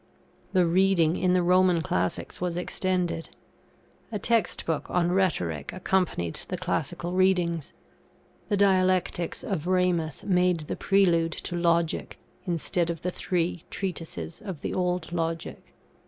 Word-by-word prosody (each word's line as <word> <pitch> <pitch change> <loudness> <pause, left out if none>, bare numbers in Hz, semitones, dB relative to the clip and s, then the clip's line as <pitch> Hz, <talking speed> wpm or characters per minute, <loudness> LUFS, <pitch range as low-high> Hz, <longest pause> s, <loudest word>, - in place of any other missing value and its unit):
The 185 -2 +4
reading 175 -2 +3
in 185 -1 +2
the 180 -1 +3
Roman 180 -1 +4
classics 90 - -2
was 175 -1 -1
extended. 180 -2 -1 0.8
A 215 - -1
text 230 +2 +1
book 160 -2 -2
on 175 -1 +1
Rhetoric 90 - 0
accompanied 180 - -1
the - - -3
classical 175 - -2
readings. 180 -4 +1 0.8
The 205 - +2
dialectics 185 -3 +2
of 175 -5 -3
Ramus 180 -5 +1
made 180 -3 +2
the 150 - -4
prelude 170 -5 +3
to 175 - -4
Logic, 170 -1 +1 0.3
instead 170 0 0
of 165 -2 -3
the 180 - -1
three 175 -2 -1
treatises 165 - -5
of 190 -8 -6
the - - -3
old 180 -2 -1
Logic. 165 -1 -3
175 Hz, 130 wpm, -27 LUFS, 165-185 Hz, 0.8 s, The